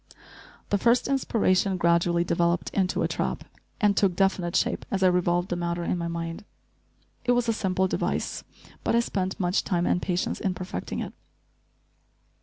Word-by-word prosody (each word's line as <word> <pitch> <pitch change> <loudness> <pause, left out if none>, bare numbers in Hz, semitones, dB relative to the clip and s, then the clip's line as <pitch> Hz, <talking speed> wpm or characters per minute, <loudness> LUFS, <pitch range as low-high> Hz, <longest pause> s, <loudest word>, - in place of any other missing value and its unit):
The 205 - +2
first 235 +3 +3
inspiration 200 -8 +1
gradually 170 0 +3
developed 170 0 0
into 190 -2 0
a - - +2
trap, - - -2 0.4
and 205 -2 +3
took 195 -3 +2
definite 185 -2 +1
shape - - +1
as 195 -1 0
I - - +7
revolved 175 0 +1
the 175 - -1
matter 170 0 -2
in 170 - 0
my 170 -1 -3
mind. 165 +1 -4 0.8
It 245 0 +3
was 245 -1 +1
a 230 - +2
simple 190 -3 0
device, - - -2 0.4
but - - +1
I - - +5
spent 190 -4 -2
much 180 +1 +1
time 175 -3 0
and 180 - +1
patience 180 -1 -1
in 190 -2 -1
perfecting 180 0 -5
it. - - -6
185 Hz, 170 wpm, -26 LUFS, 175-195 Hz, 0.8 s, I